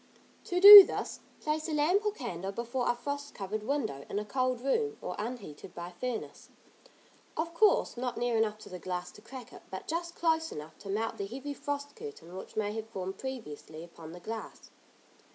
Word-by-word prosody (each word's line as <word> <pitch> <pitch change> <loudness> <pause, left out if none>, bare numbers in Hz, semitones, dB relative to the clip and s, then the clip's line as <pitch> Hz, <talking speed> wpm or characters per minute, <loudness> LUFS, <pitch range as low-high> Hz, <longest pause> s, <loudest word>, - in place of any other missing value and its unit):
To 360 - -1
do 405 +1 +14
this, - - -5 0.2
place 310 +1 -2
a - - -2
lamp 330 +8 +2
or 420 - +1
candle 195 - -5
before 240 +4 -2
a 240 - +2
frost 285 +3 -5
covered 205 +2 -4
window, 220 - -2
in - - -3
a 210 - -2
cold 255 +2 -1
room, 430 - 0
or - - -5
unheated 210 -9 -7
by 175 +1 -7
furnace, 235 +6 -6 0.9
of 330 +1 -2
course 415 +5 +3
not 250 0 -3
near 240 -1 0
enough 220 -1 +1
to - - -11
the 180 - -8
glass 180 0 -4
to - - -16
crack 245 +1 -11
it, - - -12
but 190 - -7
just 340 +1 -3
close 320 -1 +1
enough 150 +1 -8
to 200 - -10
melt 220 +3 -2
the 200 - -3
heavy 270 +6 -6
frost 285 0 -5
curtain 430 - -10
which 190 - -9
may 205 -1 0
have 220 0 -6
formed 190 -2 -6
previously 165 - -7
upon 165 -2 -12
the 175 - -10
glass. 220 +4 -8
240 Hz, 195 wpm, -30 LUFS, 195-290 Hz, 0.9 s, do